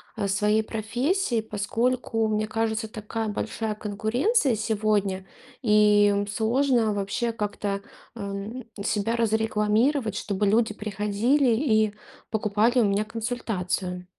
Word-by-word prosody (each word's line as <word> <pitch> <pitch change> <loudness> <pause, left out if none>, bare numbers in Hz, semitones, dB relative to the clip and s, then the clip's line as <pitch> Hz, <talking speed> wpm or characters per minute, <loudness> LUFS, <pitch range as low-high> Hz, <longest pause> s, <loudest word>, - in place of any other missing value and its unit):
а, 210 -3 -1
своей 210 +2 +2
профессией, 240 - -1
поскольку, 225 +3 -1
мне 215 0 0
кажется, 220 0 -1
такая 220 +1 -4
большая 220 +1 -3
конкуренция 230 - +1
сегодня, 210 -3 0 0.4
и, 210 -2 +5
м, 200 0 -1
сложно 230 +1 +2
вообще 205 +4 -1
как-то, 205 -2 -3 0.3
ам, 205 +3 -6 0.2
себя 225 +1 0
разрекламировать, 220 +2 +1
чтобы 205 0 -1
люди 215 +1 +2
приходили 215 +6 +1
и 220 -5 +2 0.3
покупали 220 +3 +2
у - - +3
меня 200 +1 +1
консультацию. 200 -6 -3
215 Hz, 110 wpm, -26 LUFS, 205-230 Hz, 0.4 s, и